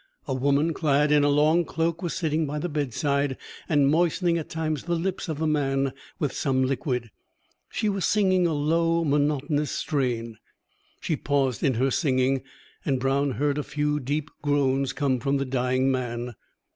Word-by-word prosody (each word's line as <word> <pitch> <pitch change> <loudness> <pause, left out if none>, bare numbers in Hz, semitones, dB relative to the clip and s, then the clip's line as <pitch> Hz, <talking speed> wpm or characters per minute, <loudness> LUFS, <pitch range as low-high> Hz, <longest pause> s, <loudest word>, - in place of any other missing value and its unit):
A - - -1
woman 140 +5 +2
clad 150 -1 +2
in 150 -1 +5
a 145 - +4
long 155 +4 +4
cloak 165 +1 -2
was 175 -3 -3
sitting 160 -2 0
by 150 +2 -3
the 150 - -2
bedside, 140 -2 -1 0.3
and 145 -4 +4
moistening 170 +2 +2
at 155 - -7
times 155 -3 -2
the 170 0 0
lips 180 +1 -3
of 155 - -2
the 160 - -1
man 135 -3 +1 0.2
with 145 -4 -1
some 130 -2 +1
liquid. 125 -3 -2 0.6
She 215 - -1
was 195 -2 -1
singing 185 -4 +3
a 165 - 0
low 165 +3 +1
monotonous 145 0 +1
strain. 120 -7 -2 0.6
She 160 - 0
paused 135 -5 0
in 130 - +2
her 130 +4 +1
singing, 130 -3 +1 0.4
and 135 -3 0
Brown 135 +1 +1
heard 145 +1 0
a - - -2
few 150 +1 -1
deep 145 +3 -3
groans 140 -2 +1
come 135 -2 0
from 140 +3 0
the 135 - -1
dying 130 +1 +1
man. 120 -1 -3
145 Hz, 170 wpm, -26 LUFS, 135-155 Hz, 0.6 s, in